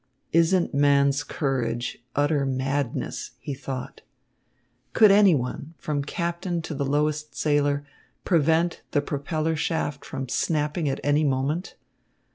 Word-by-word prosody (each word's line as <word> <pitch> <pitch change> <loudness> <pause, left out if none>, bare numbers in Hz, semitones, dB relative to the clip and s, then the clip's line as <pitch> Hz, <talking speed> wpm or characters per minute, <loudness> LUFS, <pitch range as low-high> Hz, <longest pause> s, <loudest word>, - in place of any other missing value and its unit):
"Isn't 170 +2 +3
man's 140 0 +3
courage 125 -5 -2
utter 145 0 +2
madness?" 135 0 -2
he 145 - -5
thought. 130 -1 -6 0.9
Could 215 -2 +7
any 200 -4 +6
one, 140 +4 -4
from 145 -2 -2
captain 170 +2 -3
to 160 - -5
the 140 -1 -2
lowest 150 +2 -1
sailor, 145 -1 +1 0.4
prevent 165 0 +2
the 145 - +3
propeller 155 +3 -1
shaft 145 -2 -2
from 135 -1 -5
snapping 150 +3 0
at 135 - -2
any 145 +2 +3
moment? 145 +5 -1
145 Hz, 120 wpm, -25 LUFS, 140-160 Hz, 0.9 s, Could